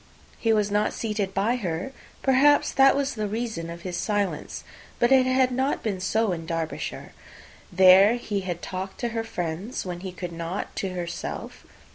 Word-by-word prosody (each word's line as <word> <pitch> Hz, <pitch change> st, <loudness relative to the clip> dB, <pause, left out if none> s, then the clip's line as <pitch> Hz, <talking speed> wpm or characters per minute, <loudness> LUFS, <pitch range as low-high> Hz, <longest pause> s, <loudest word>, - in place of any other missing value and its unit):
He 225 Hz, -, +2 dB
was 210 Hz, -2 st, +2 dB
not 210 Hz, +1 st, +1 dB
seated 210 Hz, -3 st, -2 dB
by 225 Hz, +6 st, +1 dB
her: 180 Hz, +1 st, -3 dB, 0.3 s
perhaps 280 Hz, +2 st, +4 dB
that 270 Hz, 0 st, +5 dB
was 280 Hz, 0 st, 0 dB
the 215 Hz, -2 st, -2 dB
reason 220 Hz, -6 st, -3 dB
of 170 Hz, 0 st, -8 dB
his 180 Hz, -2 st, -4 dB
silence; 205 Hz, +1 st, -2 dB, 0.3 s
but 240 Hz, +2 st, +2 dB
it 260 Hz, -1 st, +6 dB
had 255 Hz, 0 st, +3 dB
not 265 Hz, +3 st, 0 dB
been 200 Hz, -4 st, -2 dB
so 215 Hz, +3 st, +1 dB
in 165 Hz, -2 st, -4 dB
Derbyshire. 165 Hz, -1 st, -4 dB, 0.6 s
There 190 Hz, +4 st, +7 dB
he 215 Hz, -4 st, -3 dB
had 175 Hz, -3 st, -5 dB
talked 190 Hz, +1 st, -5 dB
to 240 Hz, -, 0 dB
her 225 Hz, 0 st, -2 dB
friends 180 Hz, +1 st, -4 dB
when 175 Hz, -1 st, -5 dB
he 190 Hz, +1 st, -6 dB
could 180 Hz, -1 st, -6 dB
not 170 Hz, +3 st, -5 dB
to 190 Hz, -2 st, -2 dB
herself. 170 Hz, -1 st, -6 dB
200 Hz, 175 wpm, -25 LUFS, 180-235 Hz, 0.6 s, There